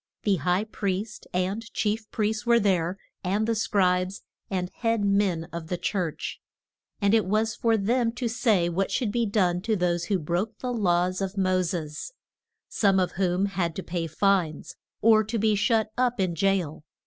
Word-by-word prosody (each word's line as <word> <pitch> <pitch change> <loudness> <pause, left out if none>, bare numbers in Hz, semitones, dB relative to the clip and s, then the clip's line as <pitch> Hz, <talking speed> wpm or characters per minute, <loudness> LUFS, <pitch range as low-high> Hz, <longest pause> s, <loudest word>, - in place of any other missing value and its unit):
The 200 -3 +2
high 180 +6 +1
priest 210 0 -4
and 195 +6 -2
chief 215 0 -1
priests 215 0 -1
were 235 +1 +4
there, 185 -3 +1 0.3
and 200 +4 0
the 230 - +2
scribes, 185 -3 +1 0.3
and 180 -2 -2
head 225 -3 +1
men 200 -4 +2
of 170 -1 -5
the 180 - -2
church, 175 -4 -3 0.6
and 200 -1 +2
it 225 -1 +4
was 215 +4 +1
for 225 -1 +2
them 230 +3 +1
to 245 0 -2
say 220 -6 +2
what 185 +3 -1
should 230 -5 0
be 235 0 0
done 180 -4 +1
to 220 +2 0
those 175 -2 0
who 200 0 +1
broke 175 +6 -2
the 250 -1 -3
laws 185 -3 +1
of 195 +1 -3
Mo 185 -1 +2
ses; 165 - -4 0.5
some 195 -3 +2
of 180 - +1
whom 185 +1 +1
had 175 -4 -2
to 190 - -4
pay 170 -1 -3
fines, 175 -1 0 0.3
or 220 -1 +6
to 220 +2 -3
be 215 0 +2
shut 220 +1 +2
up 245 -2 +1
in 185 -3 +1
jail. 175 -4 0
195 Hz, 180 wpm, -26 LUFS, 180-220 Hz, 0.6 s, or